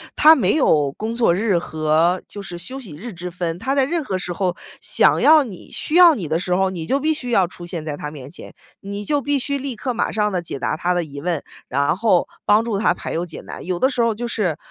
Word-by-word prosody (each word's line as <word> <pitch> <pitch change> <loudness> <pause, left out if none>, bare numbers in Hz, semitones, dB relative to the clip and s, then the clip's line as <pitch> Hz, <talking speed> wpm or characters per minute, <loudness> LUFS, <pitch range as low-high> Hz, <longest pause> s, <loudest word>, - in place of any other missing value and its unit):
他 315 +2 +8
没 280 - +2
有 150 - +3
工 225 +2 -4
作 230 -8 +3
日 200 -1 +1
和 160 +2 +1
就 205 - -8
是 175 -3 -7
休 255 +10 -5
息 190 - -10
日 220 +6 -8
之 175 +1 -7
分。 170 -1 -3
他 265 +5 -1
在 270 -2 +3
任 330 +1 -1
何 190 -7 -2
时 180 -1 -4
候 180 -1 -1 0.3
想 - - +3
要 310 -1 +7
你， 200 -8 -10
需 310 - -3
要 345 -4 +8
你 180 -9 -4
的 160 +2 0
时 180 0 -1
候， 190 0 +2
你 170 -4 -5
就 275 +9 +1
必 315 +2 +1
须 250 -5 -5
要 195 -6 +3
出 175 0 -11
现 170 -3 -5
在 150 -2 -3
他 150 0 -6
面 140 -3 -10
前， 175 - -11 0.3
你 200 +1 -5
就 290 -2 +1
必 285 0 0
须 280 +2 -2
立 270 -2 -4
刻 250 +3 -3
马 - - -1
上 210 -1 0
地 180 - -1
解 165 -5 -6
答 155 - -1
他 175 +3 0
的 175 -1 0
疑 140 -2 -9
问， 175 -1 -1 0.3
然 140 +5 +1
后 200 -4 +2 0.2
帮 215 +2 +4
助 215 -4 -1
他 215 - +2
排 - - -6
忧 170 +2 -1
解 165 - -9
难， - - -9
有 180 -1 -2
的 260 - +3
时 255 -3 -1
候 230 -1 +2
就 240 +3 -4
是， 185 -9 -1
190 Hz, 285 characters per minute, -21 LUFS, 170-245 Hz, 0.3 s, 他